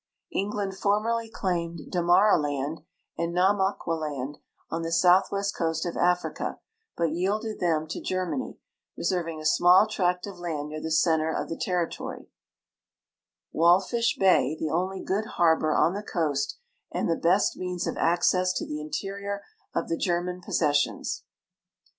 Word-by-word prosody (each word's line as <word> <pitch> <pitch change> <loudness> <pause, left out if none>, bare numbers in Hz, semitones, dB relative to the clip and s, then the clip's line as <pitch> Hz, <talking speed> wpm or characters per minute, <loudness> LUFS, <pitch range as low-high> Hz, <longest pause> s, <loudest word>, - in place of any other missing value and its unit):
England 200 -1 -2
formerly 220 +4 0
claimed 170 -5 -2
Damaraland 160 -5 +2 0.4
and 170 0 0
Nama 190 +2 +3
qualand, 150 -4 -3 0.3
on 165 - -2
the 165 - -3
soutlnvest 190 +3 +3
coast 160 0 -1
of 175 - -3
Africa, 180 0 0 0.4
l)ut 165 -2 +1
yielded 205 +6 -1
them 160 -3 +1
to 160 - -6
Germany, 185 +7 -3 0.4
reserving 170 -4 -1
a 155 - -8
small 180 +5 +6
tract 180 -4 0
of 195 -3 -9
land 155 -4 -3
near 155 0 -6
the 160 - -3
center 160 0 +2
of - - -3
the 165 - -3
territory, 175 -2 -3 1.2
M'alfish 190 +8 +3
Ijay, 160 -6 +3
the 155 -1 -2
only 185 +3 -1
good 205 +3 -1
harl)or 160 -2 +3
on 170 - +3
the 205 - -3
coast 145 -8 -1 0.3
and - - -1
the 165 - +2
best 180 +5 +2
means 180 -1 -3
of - - -2
access 180 +2 +2
to - - -3
the 150 0 -5
interior 200 +5 -4 0.3
of - - -1
the 165 - -1
German 180 0 -1
possessions. 145 -4 0
175 Hz, 140 wpm, -27 LUFS, 160-195 Hz, 1.2 s, small